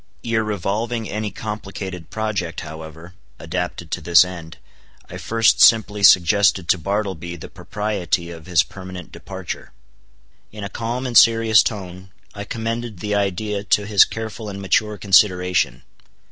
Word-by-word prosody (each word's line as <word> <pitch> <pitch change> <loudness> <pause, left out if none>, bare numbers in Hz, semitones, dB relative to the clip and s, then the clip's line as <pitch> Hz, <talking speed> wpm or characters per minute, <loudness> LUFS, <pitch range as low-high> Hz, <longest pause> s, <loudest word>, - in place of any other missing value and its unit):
Ere 115 -1 0
revolving 110 +3 -2
any 105 0 -3
complicated 95 -5 -7
project, 105 -6 -3
however, 80 +2 -10 0.2
adapted 85 0 -5
to 90 - -3
this 85 +2 +6
end, 85 -2 -9 0.5
I - - -8
first 115 -1 +2
simply 110 -2 +5
suggested 95 0 +5
to 90 - +3
Bartleby 95 -2 -3
the 85 - -10
propriety 95 -5 -3
of 80 -1 -11
his 85 -5 +3
permanent 90 +4 -10
departure. - - -8 0.8
In 105 -1 -8
a 100 - -5
calm 120 +5 -4
and 125 -2 -4
serious 115 -2 +6
tone, 95 -2 -5 0.2
I 100 -1 -7
commended 115 0 -4
the 105 +3 -3
idea 100 +1 -1
to 105 0 +1
his 105 -2 +6
careful 110 -1 -6
and 100 -1 -7
mature 105 +2 0
consideration. 90 - +2
100 Hz, 140 wpm, -21 LUFS, 90-110 Hz, 0.8 s, this